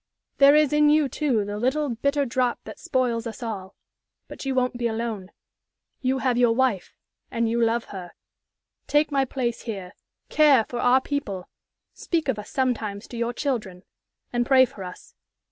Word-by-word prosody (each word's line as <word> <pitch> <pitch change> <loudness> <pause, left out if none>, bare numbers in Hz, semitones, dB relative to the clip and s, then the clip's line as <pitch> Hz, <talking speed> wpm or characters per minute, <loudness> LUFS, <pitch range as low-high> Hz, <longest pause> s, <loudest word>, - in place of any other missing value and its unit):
There 280 +1 +8
is 300 -2 +4
in 300 0 +5
you, 300 -1 +4
too, 255 -6 0
the 205 +1 -4
little, 280 +5 0
bitter 280 +4 0
drop 250 -1 0
that - - -10
spoils 240 -3 -1
us 225 +1 -7
all; 200 -4 -6 0.5
but - - -9
you 270 -1 -1
won't 250 -1 0
be 240 - +1
alone. 220 -4 -4 0.7
You 260 0 +1
have 255 -2 +1
your 240 -2 +4
wife, 250 -7 0 0.3
and 230 -2 0
you 235 +1 +1
love 230 +1 +1
her. 180 -3 -8 0.7
Take 295 +1 +2
my 275 -1 +2
place 245 -3 -3
here, 195 -5 -6 0.3
care 285 -7 +5
for 240 - -5
our 250 +2 +4
people, 220 -11 -4 0.4
speak 325 -4 -2
of 225 -5 0
us 210 - -9
sometimes 225 -6 -2
to - - -8
your 235 0 -1
children, 220 -9 -3 0.5
and 240 0 +2
pray 260 +1 +5
for 205 -5 -10
us. 180 -1 -10
245 Hz, 175 wpm, -24 LUFS, 225-270 Hz, 0.7 s, There